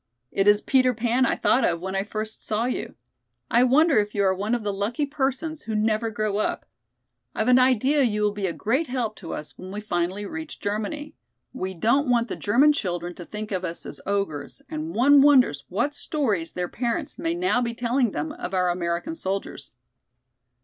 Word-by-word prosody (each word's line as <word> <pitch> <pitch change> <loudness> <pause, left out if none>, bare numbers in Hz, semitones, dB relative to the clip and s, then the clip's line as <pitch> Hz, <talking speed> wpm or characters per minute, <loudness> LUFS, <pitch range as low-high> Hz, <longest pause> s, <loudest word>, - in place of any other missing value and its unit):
"It 195 +1 +1
is 205 0 +5
Peter 255 -2 +3
Pan 240 +3 +2
I - - +1
thought 260 - +2
of 170 -1 +1
when 190 +2 -4
I 195 - +1
first 215 +1 -5
saw 220 +2 0
you. 250 - -3 0.6
I 240 +2 +5
wonder 280 +1 +5
if 210 0 -2
you 200 - +2
are 190 -1 +3
one 205 +5 -1
of 235 - -4
the 205 -1 -1
lucky 215 +9 -1
persons 290 +2 -2
who 220 - -3
never 215 +1 +1
grow 215 -1 -1
up? 215 - -1 0.7
I've 220 - 0
an 250 0 +6
idea 260 +3 +3
you 210 -5 +1
will 210 - +3
be 205 -1 -2
a - - -1
great 260 - 0
help 245 -4 -2
to 170 - -8
us 150 - -9
when 185 +1 -8
we 205 - -4
finally 190 0 -2
reach 320 +5 -7
Germany. 220 +9 -3 0.4
We 190 -7 -4
don't 240 - +2
want 240 -1 +2
the - - -3
German 265 +9 +4
children 175 - -3
to 175 - -10
think 210 +2 -6
of 185 -2 -2
us 170 -2 -5
as - - -9
ogres 200 - -3
and 315 +1 -4
one 280 +3 +6
wonders 255 - +4
what 235 +10 0
stories 220 - -1
their 180 0 -2
parents 235 +2 -3
may 330 +1 -1
now 350 -8 +1
be 235 -1 -2
telling 245 +1 +1
them 150 -4 -3
of 185 - -5
our 180 -1 +2
American 175 - -2
soldiers." 195 - -4
220 Hz, 205 wpm, -25 LUFS, 195-260 Hz, 0.7 s, an